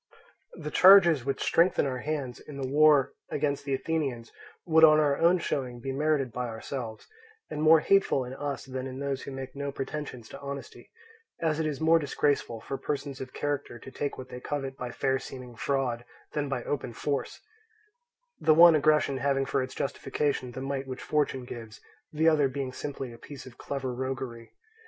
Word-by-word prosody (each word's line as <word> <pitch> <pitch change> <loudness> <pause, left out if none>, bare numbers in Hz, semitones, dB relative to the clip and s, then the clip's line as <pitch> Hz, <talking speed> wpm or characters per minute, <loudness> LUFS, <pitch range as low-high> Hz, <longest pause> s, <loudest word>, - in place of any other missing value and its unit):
The 150 -3 -6
charges 175 -8 +7
which 135 - -1
strengthen 170 -1 +3
our 130 -2 -2
hands 140 -4 -3
in 145 - -10
the 135 -1 -3
war 145 0 +5 0.2
against 145 -1 -1
the 140 -1 0
Athenians 135 -7 -2 0.3
would 160 -1 +4
on 155 -1 +8
our 145 -2 +3
own 170 +2 +5
showing 130 -7 -3
be 135 +3 -4
merited 140 -2 0
by 125 +2 -3
ourselves, 115 0 -6 0.5
and 150 - -3
more 155 0 +7
hateful 195 -9 +3
in 125 - -7
us 140 0 -4
than 130 0 -5
in 130 0 -7
those 140 -1 -2
who - - -7
make 135 0 -7
no 140 0 -3
pretensions 135 -4 -6
to 140 - -9
honesty; 140 0 -8 0.5
as 160 -2 0
it 160 - 0
is 145 -3 -3
more 165 +1 +5
disgraceful 140 -5 0
for 135 - -5
persons 140 -2 -4
of 130 -1 -6
character 145 -4 -3
to 130 - -11
take 145 +1 -3
what 130 0 -8
they 125 0 -7
covet 135 0 -4
by 125 -2 -5
fair 135 +1 0
seeming 125 -2 -9
fraud 125 -1 -1 0.3
than 145 -2 -1
by 130 -3 -2
open 130 -4 -3
force; 140 +3 -3 1.0
the 155 - +4
one 170 +1 +9
aggression 150 -2 +3
having 135 0 +1
for 135 - 0
its 130 - -5
justification 135 -2 -2
the 130 - -6
might 135 0 -3
which 130 -1 -6
fortune 140 -4 0
gives, 115 -3 -9 0.3
the 160 +1 +1
other 150 -3 +4
being 130 -1 -4
simply 135 -3 -5
a 115 - -13
piece 145 -3 -10
of 125 -1 -13
clever 135 -3 -4
roguery. 130 -2 -5
140 Hz, 190 wpm, -28 LUFS, 130-150 Hz, 1.0 s, one